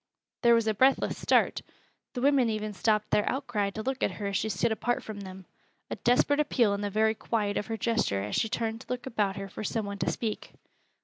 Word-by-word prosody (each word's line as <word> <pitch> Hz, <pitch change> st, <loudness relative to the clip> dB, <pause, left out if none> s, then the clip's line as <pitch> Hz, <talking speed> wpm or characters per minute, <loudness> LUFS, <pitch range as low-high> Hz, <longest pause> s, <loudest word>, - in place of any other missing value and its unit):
There 235 Hz, -1 st, +6 dB
was 230 Hz, -1 st, +2 dB
a 220 Hz, -, +2 dB
breathless 260 Hz, +6 st, +3 dB
start. -, -, +2 dB, 0.5 s
The 250 Hz, -2 st, -4 dB
women 275 Hz, -4 st, +4 dB
even 215 Hz, -1 st, -3 dB
stopped 210 Hz, +1 st, 0 dB
their 210 Hz, -, +2 dB
outcry 240 Hz, -7 st, -1 dB
to 215 Hz, +2 st, -6 dB
look 265 Hz, +1 st, -2 dB
at -, -, +1 dB
her 205 Hz, -, -6 dB
as 200 Hz, 0 st, -2 dB
she 220 Hz, -, -1 dB
stood 225 Hz, +2 st, 0 dB
apart 240 Hz, +2 st, -1 dB
from 215 Hz, -2 st, -7 dB
them, 190 Hz, -1 st, -9 dB, 0.5 s
a -, -, -1 dB
desperate 265 Hz, +4 st, +2 dB
appeal 245 Hz, -8 st, +2 dB
in 200 Hz, -, -2 dB
the 205 Hz, -, -1 dB
very 220 Hz, +2 st, +2 dB
quiet 210 Hz, -2 st, -1 dB
of -, -, -2 dB
her 225 Hz, -, -3 dB
gesture 215 Hz, -, 0 dB
as 105 Hz, -, -3 dB
she 225 Hz, -, +1 dB
turned 225 Hz, -1 st, -2 dB
to -, -, -15 dB
look 250 Hz, 0 st, -3 dB
about 210 Hz, -6 st, 0 dB
her 195 Hz, 0 st, -5 dB
for 195 Hz, -, -7 dB
some 220 Hz, 0 st, -2 dB
one 200 Hz, 0 st, -6 dB
to -, -, 0 dB
speak. 220 Hz, -3 st, -4 dB
220 Hz, 235 wpm, -28 LUFS, 205-240 Hz, 0.5 s, There